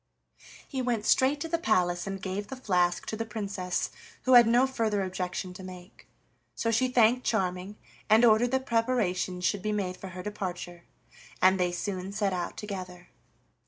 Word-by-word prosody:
He 265 Hz, -2 st, -3 dB
went 235 Hz, -4 st, -1 dB
straight 270 Hz, +3 st, +3 dB
to 330 Hz, -, -2 dB
the 335 Hz, +1 st, -1 dB
palace 180 Hz, -, +1 dB
and 195 Hz, 0 st, -4 dB
gave 195 Hz, +2 st, -4 dB
the 265 Hz, -, -6 dB
flask 180 Hz, -8 st, +1 dB
to -, -, -4 dB
the 225 Hz, -, -2 dB
Princess, 200 Hz, -5 st, -3 dB, 0.3 s
who 260 Hz, -, +3 dB
had 240 Hz, -2 st, +9 dB
no 240 Hz, +3 st, +5 dB
further 220 Hz, -6 st, 0 dB
objection 185 Hz, 0 st, -4 dB
to 180 Hz, -, -10 dB
make. 185 Hz, 0 st, -12 dB, 0.5 s
So 230 Hz, -, 0 dB
she 230 Hz, +3 st, +2 dB
thanked 250 Hz, 0 st, +3 dB
Charming, 185 Hz, -1 st, -1 dB, 0.3 s
and 220 Hz, +3 st, +6 dB
ordered 230 Hz, +2 st, +5 dB
that 265 Hz, +1 st, -1 dB
preparations 205 Hz, -7 st, 0 dB
should 205 Hz, -, +1 dB
be 215 Hz, -, -1 dB
made 190 Hz, -3 st, -2 dB
for 195 Hz, -, -8 dB
her 180 Hz, 0 st, -8 dB
departure, 180 Hz, -4 st, -5 dB, 0.5 s
and 190 Hz, +1 st, +4 dB
they 180 Hz, -1 st, +1 dB
soon 185 Hz, +1 st, -4 dB
set 200 Hz, -2 st, 0 dB
out 175 Hz, -1 st, -4 dB
together. 185 Hz, -4 st, -7 dB
200 Hz, 175 wpm, -28 LUFS, 180-230 Hz, 0.5 s, had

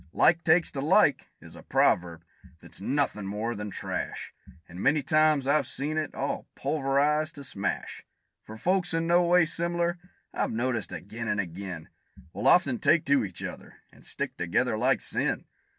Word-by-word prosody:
"Like 170 Hz, +1 st, +4 dB
takes 165 Hz, +1 st, +3 dB
to 135 Hz, -, -4 dB
like," 145 Hz, -, +3 dB
is -, -, -14 dB
a -, -, -11 dB
proverb 85 Hz, -2 st, +1 dB, 0.4 s
that's 85 Hz, +2 st, -10 dB
nothin' 125 Hz, -4 st, -1 dB
more 105 Hz, +4 st, -3 dB
than 105 Hz, -1 st, -5 dB
trash; -, -, -5 dB, 0.3 s
And 90 Hz, +2 st, -9 dB
many 145 Hz, +2 st, +3 dB
a -, -, -16 dB
time 155 Hz, -2 st, +3 dB
I've 150 Hz, +2 st, +2 dB
seen 150 Hz, +3 st, -3 dB
it 155 Hz, -2 st, -3 dB
all -, -, -3 dB
pulverized 150 Hz, +2 st, 0 dB
to 140 Hz, -, -8 dB
smash. 100 Hz, -8 st, -4 dB, 0.4 s
For 110 Hz, -, -10 dB
folks 180 Hz, -, +1 dB
in 165 Hz, 0 st, 0 dB
no 175 Hz, +1 st, +4 dB
way 175 Hz, 0 st, +4 dB
sim'lar, 170 Hz, +1 st, -1 dB, 0.3 s
I've -, -, -1 dB
noticed 120 Hz, +1 st, -2 dB
ag'in 100 Hz, +7 st, -6 dB
and 105 Hz, -, 0 dB
ag'in, 90 Hz, -2 st, -5 dB, 0.5 s
Will 100 Hz, -, -2 dB
often 140 Hz, -9 st, +4 dB
take 155 Hz, 0 st, +3 dB
to 140 Hz, -3 st, +3 dB
each 95 Hz, -4 st, -6 dB
other, -, -, -8 dB, 0.2 s
and -, -, -20 dB
stick -, -, -4 dB
together 100 Hz, +8 st, 0 dB
like 125 Hz, +4 st, +1 dB
sin. -, -, -1 dB
135 Hz, 170 wpm, -27 LUFS, 105-155 Hz, 0.5 s, Like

